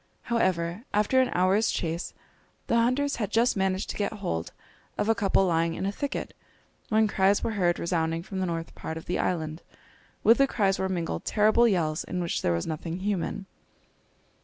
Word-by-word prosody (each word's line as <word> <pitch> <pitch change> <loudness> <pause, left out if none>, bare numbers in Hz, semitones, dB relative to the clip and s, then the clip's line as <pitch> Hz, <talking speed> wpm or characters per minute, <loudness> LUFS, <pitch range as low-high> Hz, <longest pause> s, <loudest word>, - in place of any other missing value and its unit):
However, 185 -4 0
after 215 +5 +3
an 255 - +1
hour's 190 +5 +2
chase, 165 0 -3 0.5
the - - 0
hunters 255 +5 +2
had 210 -5 -2
just 235 +2 +2
managed 190 0 0
to - - -7
get 205 - -1
hold 180 - -3 0.5
of - - 0
a 225 - +5
couple 195 -3 +2
lying 165 -1 +1
in - - -3
a 200 - 0
thicket, 285 +7 -4 0.5
when 220 0 +3
cries 195 0 +2
were - - 0
heard 180 -5 +1
resounding 165 -1 -1
from 190 +1 -5
the 185 - 0
north 165 -1 -4
part 160 - -6
of 160 - -8
the 180 - -2
island. 160 -2 -2 0.6
With 230 +3 +6
the 275 - +5
cries 195 -6 +1
were 190 - 0
mingled 170 - -2
terrible 220 +3 +4
yells, 165 -6 0
in 180 - -4
which 170 -1 -1
there 85 - +1
was 85 - -1
nothing 165 +3 -4
human. 195 -1 -2
190 Hz, 185 wpm, -27 LUFS, 170-215 Hz, 0.6 s, With